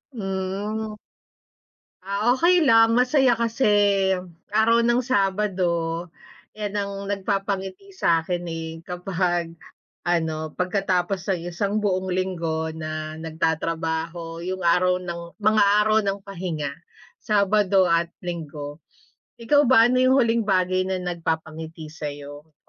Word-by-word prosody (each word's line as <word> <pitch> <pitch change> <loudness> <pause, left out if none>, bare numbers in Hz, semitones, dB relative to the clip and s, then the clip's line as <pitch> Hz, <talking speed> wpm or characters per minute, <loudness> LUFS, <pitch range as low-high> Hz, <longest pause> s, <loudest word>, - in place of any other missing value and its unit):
Hmm. 200 +2 -3 1.1
Ah, 200 +1 -3 0.2
okey 340 0 +4
lang, 225 -1 +6
masaya 255 0 +4
kasi 235 +3 -1 0.9
araw 230 +2 +4
ng 240 +1 +3
Sabado. 200 -5 0 0.9
'Yan 210 -2 -4
ang 200 -1 -1 0.2
nagpapangiti 195 - -3
sa'kin 170 - +1
eh, 165 -1 -5 0.2
kapag 175 -2 -2 0.5
ano 160 -2 -1
pagkatapos 185 0 -1
ng 185 - -1
1 200 +4 -1
buong 190 -2 -1
linggo 165 -4 -2
na 155 0 -5
nagtatrabaho 165 +1 -3
yung 185 +1 -4
araw 180 +1 +3
ng 175 -1 -5 0.2
mga 215 0 +4 0.2
araw 215 +1 +3
ng 200 0 -1
pahinga, 170 -7 -4 0.5
Sabado 200 -2 +3
at 170 0 +1
Linggo. 150 -4 -6 0.5
Ikaw 285 +4 +3
ba, 230 -3 +7
ano 255 - +3
yung 255 +1 +4
huling 235 -3 +3
bagay 185 -1 +1
na 190 - -1
nagpapangiti 160 -2 -4
sa'yo? 145 0 -8
185 Hz, 110 wpm, -24 LUFS, 165-210 Hz, 1.1 s, ba